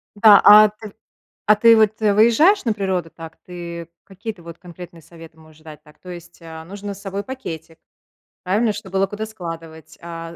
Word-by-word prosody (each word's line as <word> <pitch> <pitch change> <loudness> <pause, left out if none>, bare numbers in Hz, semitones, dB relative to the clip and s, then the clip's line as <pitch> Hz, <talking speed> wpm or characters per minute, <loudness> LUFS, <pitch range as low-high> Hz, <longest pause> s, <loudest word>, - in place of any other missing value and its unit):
Да, 205 -1 +6
а 210 0 +8
ты 215 -1 -13 0.6
а 215 - +7
ты 230 +2 +5
вот, 220 0 +1
э, 210 -1 +2
выезжаешь 235 - +3
на 225 - 0
природу, 190 -5 -3
так? 165 0 -13
Ты 170 -1 -9
какие-то 200 -1 -10
вот 170 0 -12
конкретные 175 -1 -13
советы 165 0 -16
можешь 155 0 -20
дать, 155 -2 -13
так? 150 0 -21
То 180 - -12
есть, 175 0 -12
а, 160 -1 -11
нужно 200 +3 -8
с 200 - -12
собой 195 0 -6
пакетик, 170 -11 -9 0.7
правильно? 210 +4 0
Чтобы 195 -2 -11
было 195 - +1
куда 210 +2 -6
складывать, 165 -5 -10
а. 165 0 -9
185 Hz, 185 wpm, -19 LUFS, 165-210 Hz, 0.7 s, а